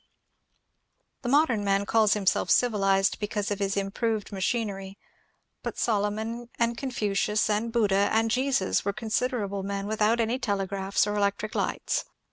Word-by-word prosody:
The 245 - -3
modem 260 -6 +3
man 200 0 +1
calls 215 0 +3
himself 200 -3 +1
civilized 195 -5 +3
because 210 -1 -2
of 205 - -2
his 195 0 -1
im 195 0 -1
proved 220 -1 -2
machinery, 195 -1 -2 0.6
but - - -5
Solomon 220 +2 -1
and 235 0 +1
Confucius 210 -5 0
and 220 +3 0
Buddha 205 -4 +2
and 225 0 +2
Jesus 255 -5 +1
were 200 - -1
considerable 220 -3 -2
men 200 0 -3
without 215 +2 +1
any 230 +3 0
telegraphs 195 -3 0
or 205 - -2
electric 205 +1 -1
lights. - - -1
210 Hz, 140 wpm, -27 LUFS, 200-230 Hz, 0.6 s, modem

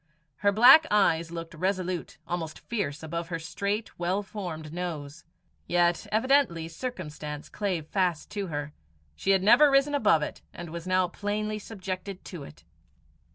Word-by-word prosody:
Her 200 -1 +3
black 255 +9 +8
eyes 170 -5 +3
looked 165 -1 -7
resolute, 185 0 -2
almost 165 -3 -3
fierce, 175 -11 -4
above 170 +1 -4
her 170 -1 -3
straight, 200 +7 -3
well 185 +4 0
formed 170 -7 -6
nose. 165 -3 -5 0.4
Yet 175 0 +2
evidently 225 - +2
circumstance 155 - -6
clave 185 -7 -2
fast 180 -2 -1
to 200 -2 -3
her. 150 -2 -4 0.4
She 195 - -3
had 190 -1 +4
never 290 +8 +7
risen 275 +1 +3
above 210 - +4
it, - - -6
and 170 -2 -7
was 170 +1 -6
now 185 0 +3
plainly 210 +3 -3
subjected 195 -2 -6
to 175 -5 -7
it. 75 0 -13
180 Hz, 150 wpm, -28 LUFS, 165-205 Hz, 0.4 s, black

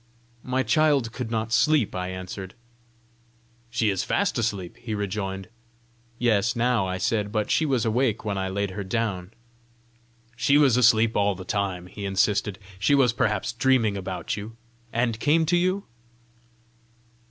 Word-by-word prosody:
"My 130 +1 -1
child 140 -1 +2
could 120 -1 -5
not 115 0 -2
sleep," 150 -2 +3
I 90 0 -3
answered. 95 +1 -7 1.1
"She 115 -3 +1
is 95 - -1
fast - - 0
asleep!" 100 -6 -3
he 110 -3 -5
rejoined. 95 -1 -3 0.7
"Yes, 115 -2 +2
now!" 120 -4 +1
I 95 0 -2
said; 105 +2 -1
"but 105 -1 -1
she 160 - +2
was 130 -5 +1
awake 115 -1 0
when 105 -2 -1
I 95 -1 -2
laid 100 0 -2
her 100 +2 -5
down." 95 -3 -2 1.0
"She 140 +4 +3
was 140 -5 +5
asleep 115 -2 +4
all 100 -1 +2
the 95 0 -9
time!" 95 -2 -2
he 100 +3 -9
insisted. 100 0 +1 0.2
"She 140 +8 +3
was 130 -4 +4
perhaps 105 +1 0
dreaming 120 -3 +2
about 95 -1 -4
you 110 +2 -8 0.3
and 115 -1 0
came 160 +4 +3
to 170 +3 +2
you?" 185 +3 +1
110 Hz, 155 wpm, -25 LUFS, 95-125 Hz, 1.1 s, was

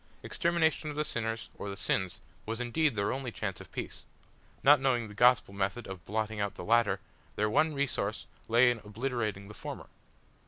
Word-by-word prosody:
Extermination 165 -2 +1
of 150 - -5
the 150 +1 0
sinners, 115 -5 -3
or 100 - -4
the 100 - -5
sins, 95 -2 -1 0.3
was 115 +1 -2
indeed 125 +3 +1
their 100 -1 +1
only 130 -2 -4
chance 105 -3 -4
of - - -13
peace! - - -6 0.6
Not 145 +1 +8
knowing 125 -4 +1
the - - -10
Gospel 120 -2 +4
method 100 +4 -1
of 95 -3 -8
blotting 110 +1 -2
out 100 -1 -1
the 90 - -7
latter, 115 +1 +3 0.4
their 105 0 +1
one 155 +5 +3
resource 125 -7 -1 0.2
lay 120 +2 +6
in 120 - -3
obliterating 110 -2 -3
the 105 - -10
former. - - -7
115 Hz, 185 wpm, -31 LUFS, 105-130 Hz, 0.6 s, Not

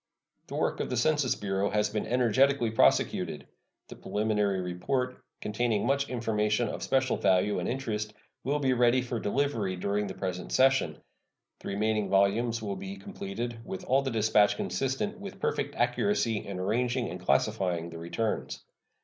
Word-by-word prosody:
The - - -6
work - - 0
of - - -2
the 125 - -1
Census 145 0 +2
Bureau 100 0 -1
has 105 -1 +1
been 105 0 -2
energetically 125 +1 +3
prosecuted. 70 -11 +2 0.4
The - - -10
preliminary 105 -2 0
report, 125 +9 -2 0.2
containing 110 0 0
much 140 +1 +1
information 110 -2 0
of - - -5
special 130 -1 +1
value 95 +2 +2
and - - -2
interest, 110 -5 -3 0.3
will 140 +3 +1
be 135 -3 +2
ready 125 +1 +3
for 120 -2 -3
delivery 110 -4 0
during 100 +3 -1
the 95 - -6
present 90 -1 -4
session. 130 - +3 0.6
The - - -9
remaining 105 +1 0
volumes 110 +4 +2
will 100 -2 -3
be 95 +1 -6
completed 115 +4 -5
with 95 - -6
all 135 +2 +3
the 135 - -2
dispatch 110 -3 +3
consistent 135 - -2
with 200 -1 -8
perfect 145 +1 -1
accuracy 120 - +1
in 100 -2 -5
arranging 120 +6 0
and 90 - -6
classifying 85 +4 +1
the 85 - -8
returns. 85 +7 -3
110 Hz, 160 wpm, -29 LUFS, 100-125 Hz, 0.6 s, energetically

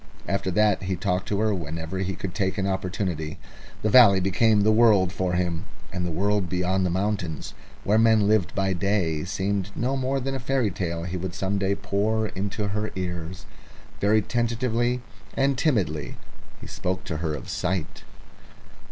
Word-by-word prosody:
After 100 -1 -1
that 105 +2 +3
he 95 0 -1
talked 90 0 -1
to 100 - -1
her 110 -1 +2
whenever 80 +1 -4
he 95 0 -2
could 95 -3 -5
take 95 -1 -1
an 95 - 0
opportunity. 95 -5 -2 0.5
The 110 - +1
valley 105 -6 +8
became 105 +3 +3
the 110 +2 +4
world 110 -5 +5
for 90 -1 -1
him, 90 0 -1 0.3
and 90 -1 -2
the 90 - -1
world 100 +2 0
beyond 90 +1 +1
the 90 - +1
mountains 95 -4 -2 0.3
where 105 +2 +3
men 110 -2 +4
lived 105 -4 +2
in 95 -2 +1
sunlight 90 -5 0
seemed 100 -1 -1
no 130 +3 0
more 135 +1 0
than 135 +1 -3
a 135 - -2
fairy 130 -4 0
tale 85 -2 -3
he 90 +1 -3
would 90 0 -5
some 100 +1 -1
day 100 0 +1
pour 105 +2 0
into 100 +2 -3
her 105 +1 -2
ears. 90 -1 -5 0.5
Very 105 +1 +3
tentatively 120 +2 0 0.3
and 135 0 +2
timidly 105 - 0 0.4
he - - -10
spoke 95 +1 -3
to 80 - -4
her 80 -1 -2
of 70 - -8
sight. 90 -3 -3
95 Hz, 175 wpm, -25 LUFS, 90-110 Hz, 0.5 s, valley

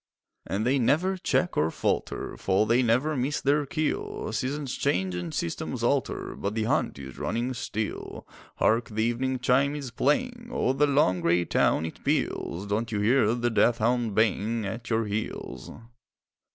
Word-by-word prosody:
And 105 +3 -1
they 135 +3 +3
never 160 +10 +2
check 180 -1 0
or 80 - +2
falter - - -2
For 95 +2 +1
they 120 +3 +3
never 130 +6 +2
miss 135 +3 0
their 145 +1 +1
kill; 415 - -2
Seasons 140 0 -2
change 95 -9 0
and 90 -2 -4
systems 85 - -3
alter, - - 0
But 100 +2 -3
the 110 - 0
hunt 110 - 0
is 65 -1 -9
running 120 +3 -1
still. 110 -2 -5 0.3
Hark! 115 +2 +2
the 110 0 -1
evening 130 +3 0
chime 140 +3 +2
is 140 -4 -5
playing, 240 - 0
O'er 130 - +1
the 145 +2 +3
long 135 -11 +3
grey 85 +1 +2
town 80 - +2
it 80 - -8
peals; 90 +4 -1
Don't 110 +3 -1
you 105 - -1
hear 115 +1 +3
the 120 0 0
death 115 +1 +3
hound 115 -2 +1
baying 110 0 +1
At 115 +4 -5
your 115 -1 +1
heels? 105 +1 -4
120 Hz, 165 wpm, -27 LUFS, 105-140 Hz, 0.3 s, they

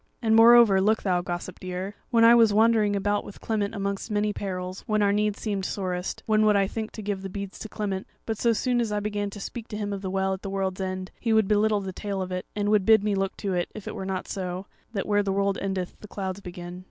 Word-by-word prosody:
And 220 -2 +2
moreover, 225 -4 +7
look 220 +3 +2
thou, 180 -3 +1
gossip 175 +1 -5
dear: 185 +2 -5 0.2
when 230 -2 +4
I 230 +1 +8
was 230 -3 +6
wandering 215 -1 +4
about 205 +1 0
with 205 - -11
Clement 215 -1 -2
amongst 200 +1 -3
many 210 0 0
perils, 185 -1 -4
when 215 -1 +2
our 200 0 +3
need 210 0 +1
seemed 200 -3 -2
sorest, 185 -1 -3
then 215 -1 +4
would 210 -1 +4
I 200 -1 +4
think 220 +2 -4
to 215 - -7
give 200 -1 -2
the 195 - -5
beads 200 0 -6
to 220 - -7
Clement; 200 -3 -3 0.2
but 220 -2 -3
so 235 - +3
soon 245 +2 +1
as 225 -2 -1
I 210 - 0
began 205 0 -2
to 205 - -9
speak 230 +3 -6
to 210 - -6
him 205 -1 -3
of 195 - -4
the 190 - -3
Well 190 0 0
at 190 - -6
the 195 - -5
World's 195 -1 -2
End 185 0 -4
he 230 -2 +1
would 220 -2 +4
belittle 210 0 +2
the 190 -1 -5
tale 200 0 -4
of 185 - -7
it, 185 0 -4
and 205 0 0
would 210 -2 +4
bid 220 0 +5
me 210 -1 +1
look 195 0 -1
to 195 -2 -2
it 175 -1 -1
if 215 - -8
it - - -4
were - - -5
not 190 -1 -3
so, 185 0 -4 0.3
that 200 -4 -2
where 205 -1 +2
the 200 -1 -1
world 200 0 +1
endeth 190 -2 -3
the 210 - -11
clouds 190 -2 -4
begin." 175 -1 -8
200 Hz, 265 wpm, -26 LUFS, 190-215 Hz, 0.3 s, I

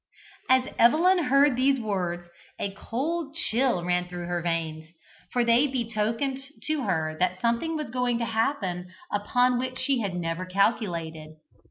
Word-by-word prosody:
As 260 0 +4
Evelyn 335 +8 +5
heard 275 +1 +4
these 265 +1 +3
words, 180 -5 -2 0.3
a 200 - -2
cold 290 - -3
chill 245 - +1
ran 180 0 +1
through 175 -1 -6
her 175 0 -2
veins, 160 -2 -3 0.4
for 245 - +2
they 235 +5 +4
betokened 235 +1 -1 0.2
to 310 -4 -1
her 160 -5 0
that 185 0 +1
something 235 - 0
was 305 -6 -4
going 250 -1 0
to 235 - -1
happen 205 -7 -1 0.2
upon 245 +4 +2
which 255 0 -3
she 275 -3 +1
had 200 -5 -2
never 165 0 -2
calculated. 170 -6 -1
230 Hz, 150 wpm, -26 LUFS, 180-260 Hz, 0.4 s, Evelyn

